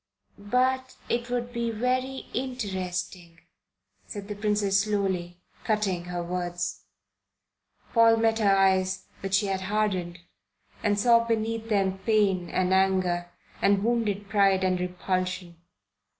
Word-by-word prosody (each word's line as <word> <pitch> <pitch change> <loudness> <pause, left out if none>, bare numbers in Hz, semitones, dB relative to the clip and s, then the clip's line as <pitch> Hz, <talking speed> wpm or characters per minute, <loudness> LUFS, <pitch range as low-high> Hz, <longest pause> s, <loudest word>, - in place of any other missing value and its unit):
"But 255 +5 0
it 240 +1 -1
would 245 0 -2
be 235 -1 -1
very 255 +4 -1
interesting," 185 -8 -4 0.7
said 200 -2 -7
the 210 - -4
Princess 205 -1 +1
slowly, 190 -4 -1 0.3
cutting 200 -5 0
her 175 -1 -4
words. 175 0 -3 1.1
Paul 230 -1 +6
met 225 0 +2
her 200 -2 +4
eyes, 190 -1 +2
which 195 0 -1
she 195 - +2
had 190 -1 -1
hardened, 190 -3 -1 0.6
and 205 -1 +1
saw 230 +1 +5
beneath 225 0 -2
them 195 -2 +1
pain 195 -4 +1
and 185 +1 +1
anger 185 -2 +2 0.3
and 200 0 +3
wounded 215 -4 0
pride 195 -2 +3
and 185 -1 +1
repulsion. 180 -1 -3
200 Hz, 120 wpm, -27 LUFS, 185-225 Hz, 1.1 s, Paul